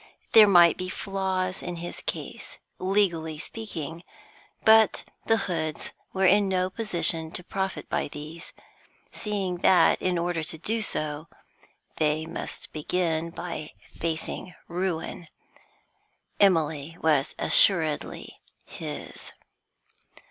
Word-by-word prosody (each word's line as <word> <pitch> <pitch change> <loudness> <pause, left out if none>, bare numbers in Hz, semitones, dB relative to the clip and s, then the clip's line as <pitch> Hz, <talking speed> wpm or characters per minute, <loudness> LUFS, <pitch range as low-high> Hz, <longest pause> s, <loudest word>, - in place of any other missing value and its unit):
There 215 -2 +9
might 175 -3 +6
be 185 0 -3
flaws 190 -1 -2
in 175 - -5
his 170 +1 -6
case, - - -5 0.2
legally 180 -5 +1
speaking, 165 -4 -6 0.6
but 220 -1 +6 0.2
the 225 - +4
Hoods 160 -4 -3 0.2
were 190 0 +1
in 200 +1 +5
no 185 0 0
position 170 -7 0
to 180 - -4
profit 190 +1 -3
by - - -1
these, 155 +3 -9 0.6
seeing 195 -4 -2
that, 180 +1 +4
in 185 -1 +1
order 170 -1 -1
to 160 +1 -2
do 220 +7 -1
so, 155 -5 -2 0.7
they 155 0 +1
must 165 - -7
begin 165 +1 -1
by 170 -2 -6 0.2
facing 165 +2 -3
ruin. 175 -1 -3 1.1
Emily 160 -4 +2
was 150 -2 +2
assuredly 160 -6 +3 0.3
his. - - -7
175 Hz, 110 wpm, -26 LUFS, 160-190 Hz, 1.1 s, There